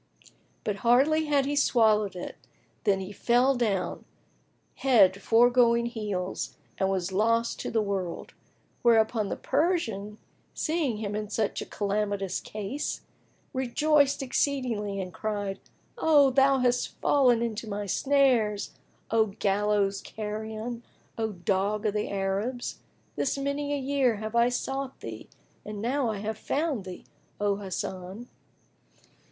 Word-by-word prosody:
But 205 -2 -2
hardly 270 +8 +3
had 285 -2 +2
he 290 +1 -1
swallowed 215 -7 +3
it, 180 - -6 0.5
when 195 -2 +3
he 190 +1 -6
fell 245 +6 +3
down, 220 -7 -1 0.7
head 200 -8 +4
foregoing 235 +1 +4
heels, 210 -6 -4 0.2
and 190 - +2
was 190 -1 -1
lost 230 +4 +1
to - - -3
the 225 -2 +1
world; 195 -4 -4 0.5
whereupon 220 -2 +3
the - - -2
Persian, 260 - -1 0.4
seeing 305 -8 0
him 210 -1 -3
in 210 -1 -3
such 215 -1 -2
calamitous 200 -2 -1
case, 215 +7 -4 0.5
rejoiced 280 +2 +2
exceedingly 245 -7 -1
and 185 -1 -5
cried, 205 -3 -3 0.4
"Thou 290 -4 +5 0.3
hast 245 -1 0
fallen 250 -5 +4
into 230 -1 -4
my 205 0 -3
snares, 240 -3 +2 0.4
O 220 -1 +4
gallows 200 0 0
carrion, 220 +2 -5 0.3
O 220 -1 -2
dog 200 +3 -1
of 210 - +1
the 210 0 -1
Arabs! 200 +6 -2 0.4
This 275 - 0
many 280 +1 -2
a 290 - +1
year 270 -3 +1
have 215 +2 -5
I 235 +1 +5
sought 270 +2 -3
thee - - -8 0.3
and 210 -1 -6
now 250 +3 0
I 215 - -2
have 215 +2 -4
found 290 - -1
thee, 185 -1 -9 0.3
O 205 -1 +1
Hasan!" 190 +2 -5
220 Hz, 125 wpm, -28 LUFS, 200-255 Hz, 0.7 s, Thou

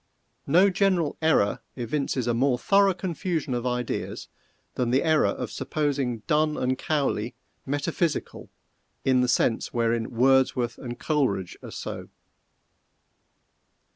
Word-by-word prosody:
No 185 +7 +5
general 185 -5 +1
error 155 -10 +2 0.2
evinces 130 +1 -1
a 120 - +1
more 125 +2 +2
thorough 195 +6 +3
confusion 170 -5 -2
of 120 +1 -2
ideas 125 -1 -3 0.4
than 125 -2 -1
the 130 +3 +2
error 155 -2 +3
of - - -3
supposing 135 -7 -2
Donne 155 -1 +1
and 130 +1 0
Cowley 135 -6 -1 0.3
metaphysical 145 +3 -2 0.6
in 130 -1 +4
the 125 - +2
sense 115 -1 +1
wherein 115 -1 +1
Wordsworth 125 -1 +2
and 120 -2 -6
Coleridge 125 - 0
are - - -9
so. - - -6
135 Hz, 120 wpm, -26 LUFS, 120-155 Hz, 0.6 s, No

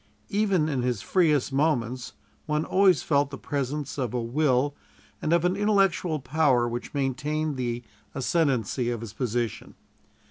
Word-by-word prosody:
Even 195 -6 +2
in 140 -5 -1
his 120 -6 -1
freest 150 - +2
moments 130 -4 0 0.3
one 150 0 0
always 190 -1 +4
felt 140 -2 +2
the 140 - -7
presence 140 +1 -3
of 125 -2 -2
a - - +1
will 130 +3 +1 0.5
and 155 - -1
of 170 0 +3
an 180 +1 +2
intellectual 195 -5 +2
power 130 -3 +2
which 120 +4 -5
maintained 150 +3 -1
the 120 -1 -3 0.3
ascendancy 130 -4 0
of 120 -2 -3
his 110 -3 -7
position. 120 -1 -3
140 Hz, 145 wpm, -26 LUFS, 125-155 Hz, 0.5 s, always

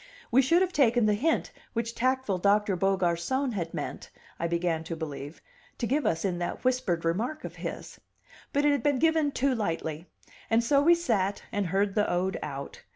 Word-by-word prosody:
We 255 +3 +6
should 335 +8 +4
have 370 -1 -2
taken 240 -5 +4
the 210 - +3
hint 305 +11 0 0.2
which 230 0 -2
tactful 255 -6 0
Doctor 200 +1 +3
Beaugarcon 195 +8 +1
had 170 -5 -3
meant, - - -5 0.3
I 170 - 0
began 170 -1 0
to 165 - -4
believe, 150 -1 -7 0.3
to 240 - -2
give 280 +6 +1
us 165 +3 0
in 180 -2 -1
that 175 - -4
whispered 250 -10 0
remark 230 - -1
of - - -7
his. - - -6 0.5
But 285 +1 +1
it 295 - +5
had 285 -3 +1
been 285 +1 +2
given 320 0 +2
too 275 0 +1
lightly, 165 -6 -3 0.4
and 230 +1 +3
so 280 +4 +3
we 340 +4 +6
sat 210 - 0
and 205 -2 -1
heard 195 +3 +1
the 210 0 +1
ode 185 +2 0
out. 140 -2 -6
210 Hz, 190 wpm, -28 LUFS, 175-265 Hz, 0.5 s, We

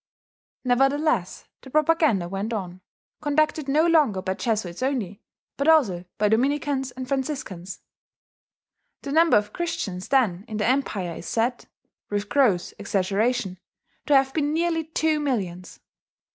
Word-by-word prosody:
Nevertheless 270 - +1 0.2
the 265 - -12
propaganda 305 - +2
went 195 +5 -3
on 185 -3 -5 0.4
conducted 305 0 +1
no 300 +4 +3
longer 295 - +3
by 190 0 -1
Jesuits 205 -4 -2
only, 240 -8 -2 0.4
but 280 - -1
also 220 - +4
by 210 - +2
Dominicans 270 +4 +1
and 255 0 -7
Franciscans. 260 - -4 1.2
The 280 - -5
number 325 -1 +5
of 210 0 -2
Christians 205 - -3
then 215 -10 +2
in 215 - -5
the 210 - 0
empire 210 -10 -1
is - - -8
said, 240 +2 -1 0.4
with 205 0 -2
gross 220 -11 +2
exaggeration, 200 +1 0 0.5
to 295 - +4
have 270 0 +3
been 295 -1 0
nearly 330 -1 0
two 320 -1 0
millions. 190 -11 -3
250 Hz, 130 wpm, -24 LUFS, 195-290 Hz, 1.2 s, number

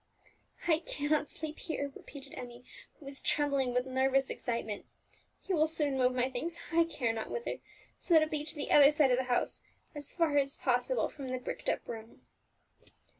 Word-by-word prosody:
"I 320 -2 +4
cannot 300 -2 0
sleep 315 -1 -6
here," 285 -4 -3
repeated 275 -1 -11
Emmie, 245 0 -9 0.3
who 295 - -15
was 275 0 -4
trembling 280 -3 +1
with 250 +1 +1
nervous 265 +1 +2
excitement. 230 -4 -3 0.6
"You 385 - -1
will 310 0 +4
soon 300 -3 +1
move 255 -1 +2
my 250 0 +2
things 290 +7 -4
I 335 0 +5
care 245 -8 -1
not 220 -1 -4
whither 475 - -3 0.4
so 345 - +2
that 315 - +8
it 310 - -3
be 300 -1 -1
to 310 +2 -4
the 295 - -3
other 285 -1 +9
side 295 -3 +4
of 250 - +4
the 260 - 0
house, 245 -1 0 0.3
as 290 -2 -6
far 325 -4 +2
as 275 0 0
possible 255 - +1
from 275 -3 -8
the 255 - -1
bricked 250 - -4
up - - -1
room." 225 0 -8
280 Hz, 190 wpm, -32 LUFS, 250-310 Hz, 0.6 s, other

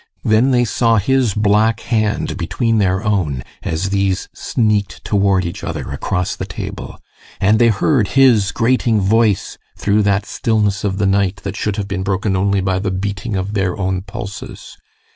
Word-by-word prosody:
Then 110 +5 +3
they 120 -2 +3
saw 115 0 +2
his 125 0 +1
black 105 +2 +2
hand 110 -3 -1
between 115 -2 0
their 95 0 +1
own 85 - -1 0.2
as 90 +5 -2
these 95 -2 0
sneaked 105 -3 -1
toward 100 -2 +2
each 85 - -6
other - - -5
across 90 -2 -2
the - - -6
table; - - -7 0.4
and 105 +3 +3
they 120 - +5
heard 115 +1 +2
his 115 -7 +5
grating 115 -2 +1
voice 105 0 +1 0.2
through 105 +1 +2
that 100 0 +1
stillness 105 -4 0
of 95 -2 -1
the 100 - +1
night 100 0 +1
that 100 0 -4
should 105 -1 -2
have 105 -2 -3
been 95 -2 -3
broken 95 +1 -1
only 100 +1 +1
by 95 0 0
the 95 0 -2
beating 100 +3 -3
of 95 +2 -3
their 95 -3 -1
own 95 -1 -1
pulses. 100 0 -8
100 Hz, 170 wpm, -18 LUFS, 95-110 Hz, 0.4 s, they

